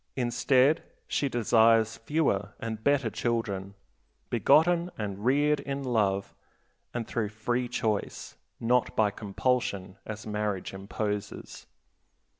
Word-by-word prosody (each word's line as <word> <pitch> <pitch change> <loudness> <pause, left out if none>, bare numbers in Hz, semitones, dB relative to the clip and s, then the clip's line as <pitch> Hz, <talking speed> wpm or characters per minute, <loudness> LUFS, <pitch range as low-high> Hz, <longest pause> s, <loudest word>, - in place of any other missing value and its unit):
Instead 130 +3 +3 0.3
she 140 - 0
desires 115 -1 +4
fewer 115 -7 0
and 110 -1 -5
better 140 -5 +2
children, 100 -5 -2 0.6
begotten 170 +2 +4
and 100 -2 -4
reared 145 +3 +3
in 140 0 -4
love 105 -6 0 0.6
and 120 -2 -4
through 110 -3 -1
free 120 +3 -1
choice; 110 -4 -2 0.2
not 125 +2 +1
by 105 -2 +3
compulsion, 100 -3 -2
as 110 0 -6
marriage 105 -3 -2
imposes. 105 +1 -5
115 Hz, 105 wpm, -28 LUFS, 105-125 Hz, 0.6 s, desires